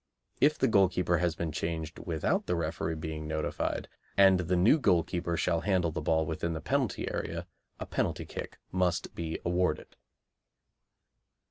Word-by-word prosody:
(If 150 Hz, +2 st, +4 dB
the -, -, +3 dB
goalkeeper 90 Hz, -4 st, +3 dB
has 85 Hz, -2 st, +1 dB
been 80 Hz, -1 st, -3 dB
changed 80 Hz, 0 st, -3 dB
without 80 Hz, -3 st, -1 dB
the 90 Hz, -, +1 dB
referee 80 Hz, 0 st, -2 dB
being 80 Hz, 0 st, -5 dB
notified, 80 Hz, 0 st, -2 dB, 0.3 s
and 95 Hz, -2 st, +7 dB
the 90 Hz, +1 st, 0 dB
new 105 Hz, -, +5 dB
goalkeeper 85 Hz, -, +1 dB
shall 85 Hz, -1 st, +1 dB
handle 90 Hz, -2 st, +1 dB
the -, -, -3 dB
ball 80 Hz, -1 st, +2 dB
within 80 Hz, +2 st, -2 dB
the 80 Hz, -, -3 dB
penalty -, -, -1 dB
area, -, -, -3 dB, 0.3 s
a -, -, -4 dB
penalty -, -, -1 dB
kick -, -, -7 dB
must 90 Hz, -2 st, 0 dB
be 80 Hz, -1 st, -3 dB
awarded.) 90 Hz, -2 st, 0 dB
85 Hz, 150 wpm, -30 LUFS, 80-90 Hz, 0.3 s, and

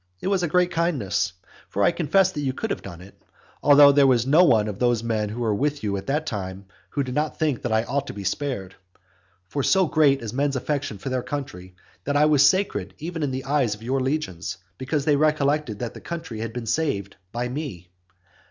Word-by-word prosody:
It -, -, -2 dB
was 195 Hz, -2 st, +1 dB
a 175 Hz, -, +1 dB
great 180 Hz, +3 st, +2 dB
kindness! 140 Hz, -, 0 dB, 0.4 s
For 100 Hz, -, 0 dB
I -, -, +5 dB
confess 175 Hz, +3 st, +2 dB
that 150 Hz, -, -4 dB
you 135 Hz, -2 st, -1 dB
could 220 Hz, +10 st, -4 dB
have -, -, -3 dB
done 85 Hz, -3 st, -9 dB
it. 100 Hz, +2 st, -16 dB, 0.4 s
Although 145 Hz, 0 st, +8 dB
there 140 Hz, -1 st, +5 dB
was 125 Hz, -2 st, +3 dB
no 155 Hz, +7 st, +6 dB
one 110 Hz, -11 st, +4 dB
of 105 Hz, -2 st, -5 dB
those 120 Hz, -2 st, +2 dB
men 110 Hz, -2 st, -1 dB
who 115 Hz, +4 st, -5 dB
were 110 Hz, -3 st, +1 dB
with 145 Hz, +5 st, -1 dB
you 100 Hz, -2 st, -1 dB
at 95 Hz, -, -6 dB
that 150 Hz, +3 st, 0 dB
time, 95 Hz, -4 st, -5 dB, 0.2 s
who 140 Hz, -, -1 dB
did 130 Hz, -1 st, -5 dB
not 150 Hz, +3 st, -1 dB
think 150 Hz, -6 st, 0 dB
that -, -, -3 dB
I 110 Hz, 0 st, +2 dB
ought 140 Hz, +3 st, -2 dB
to -, -, -6 dB
be 100 Hz, 0 st, -7 dB
spared. 100 Hz, -5 st, -3 dB, 0.7 s
For 140 Hz, -, -2 dB
so 190 Hz, +7 st, +3 dB
great 145 Hz, -5 st, +3 dB
is 110 Hz, -, -5 dB
men's 140 Hz, +1 st, 0 dB
affection 135 Hz, -4 st, -2 dB
for 115 Hz, -, -5 dB
their 130 Hz, -1 st, -1 dB
country, 95 Hz, -11 st, -6 dB, 0.3 s
that 145 Hz, 0 st, +1 dB
I 150 Hz, -, +5 dB
was 150 Hz, -2 st, +5 dB
sacred 105 Hz, -, +1 dB
even 165 Hz, +1 st, -5 dB
in 145 Hz, -, 0 dB
the 130 Hz, 0 st, -4 dB
eyes 135 Hz, -6 st, +1 dB
of 105 Hz, -, -15 dB
your 130 Hz, +3 st, 0 dB
legions, 110 Hz, -, -2 dB, 0.2 s
because 140 Hz, +2 st, -1 dB
they 150 Hz, -, +4 dB
recollected 150 Hz, -5 st, +1 dB
that 120 Hz, +1 st, -5 dB
the -, -, -11 dB
country 165 Hz, -10 st, -6 dB
had 115 Hz, 0 st, -4 dB
been 120 Hz, 0 st, -5 dB
saved 115 Hz, -6 st, -1 dB, 0.2 s
by 120 Hz, +1 st, -2 dB
me. 120 Hz, -, -6 dB
135 Hz, 225 wpm, -24 LUFS, 110-150 Hz, 0.7 s, Although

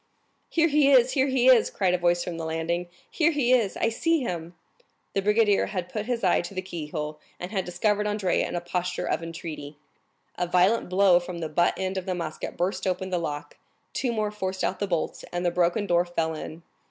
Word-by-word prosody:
"Here 330 Hz, 0 st, +3 dB
he 295 Hz, -2 st, +4 dB
is, 255 Hz, -1 st, +6 dB
here 270 Hz, -1 st, +2 dB
he 260 Hz, -2 st, +1 dB
is!" 250 Hz, -4 st, +6 dB
cried 185 Hz, -3 st, +1 dB
a -, -, +3 dB
voice 175 Hz, 0 st, +2 dB
from 170 Hz, -2 st, -5 dB
the 165 Hz, -, -4 dB
landing; 165 Hz, +2 st, -2 dB, 0.2 s
"here 330 Hz, -1 st, +2 dB
he 280 Hz, -6 st, +2 dB
is! 225 Hz, -6 st, +2 dB
I 225 Hz, -, +2 dB
see 325 Hz, +7 st, +1 dB
him!" 175 Hz, -6 st, -4 dB, 0.6 s
The 195 Hz, -, +1 dB
brigadier 210 Hz, 0 st, +3 dB
had 185 Hz, -4 st, -4 dB
put 215 Hz, 0 st, -3 dB
his 245 Hz, -3 st, -2 dB
eye 180 Hz, -, +3 dB
to 175 Hz, +3 st, -8 dB
the 185 Hz, -, -1 dB
keyhole, 150 Hz, -4 st, -5 dB, 0.2 s
and 180 Hz, +2 st, -6 dB
had 190 Hz, -4 st, -1 dB
discovered 210 Hz, +4 st, 0 dB
Andrea 205 Hz, -3 st, 0 dB
in -, -, -5 dB
a 175 Hz, -, -1 dB
posture 180 Hz, +1 st, -2 dB
of -, -, -1 dB
entreaty. 160 Hz, -3 st, -7 dB, 0.6 s
A 180 Hz, -, 0 dB
violent 180 Hz, +5 st, +3 dB
blow 185 Hz, -1 st, +5 dB
from 175 Hz, 0 st, -7 dB
the 165 Hz, -2 st, -4 dB
butt 175 Hz, +3 st, +2 dB
end 190 Hz, 0 st, -2 dB
of 185 Hz, -, -11 dB
the 185 Hz, -, -1 dB
musket 170 Hz, -3 st, -5 dB
burst 185 Hz, +1 st, -1 dB
open 185 Hz, +1 st, -2 dB
the 180 Hz, -, +1 dB
lock, 145 Hz, -2 st, -5 dB, 0.4 s
two 250 Hz, -, -1 dB
more 215 Hz, -2 st, -1 dB
forced 190 Hz, -2 st, -3 dB
out 185 Hz, -, -1 dB
the 205 Hz, -, -1 dB
bolts, 170 Hz, -4 st, -2 dB
and 175 Hz, 0 st, -2 dB
the 175 Hz, -, +2 dB
broken 175 Hz, +4 st, +1 dB
door 175 Hz, -2 st, +3 dB
fell 165 Hz, -2 st, -2 dB
in. 160 Hz, +1 st, -8 dB
180 Hz, 220 wpm, -26 LUFS, 175-210 Hz, 0.6 s, is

